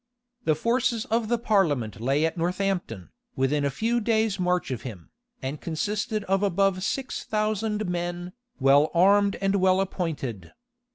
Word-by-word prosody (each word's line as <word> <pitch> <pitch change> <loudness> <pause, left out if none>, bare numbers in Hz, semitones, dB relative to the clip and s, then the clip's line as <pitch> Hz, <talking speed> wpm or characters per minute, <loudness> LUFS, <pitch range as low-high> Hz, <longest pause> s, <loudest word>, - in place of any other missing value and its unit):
The 155 - +3
forces 235 - 0
of 230 -1 +1
the 240 +2 +1
parliament 145 - +1
lay 135 +6 +2
at 165 - -1
Northampton, 175 - -2 0.2
within 140 +2 +1
a 140 - +2
few 225 - 0
days' 220 -2 +1
march 180 -4 0
of 125 - -3
him, 105 -9 -9 0.3
and 135 +3 -4
consisted 210 +5 -2
of 195 0 +1
above 195 -1 +1
six 260 +6 -3
thousand 215 -1 -1
men, 175 0 -3 0.3
well 140 +3 +5
armed 200 +3 +4
and 195 0 +2
well 185 0 +3
appointed. 150 - -3
185 Hz, 150 wpm, -26 LUFS, 150-210 Hz, 0.3 s, well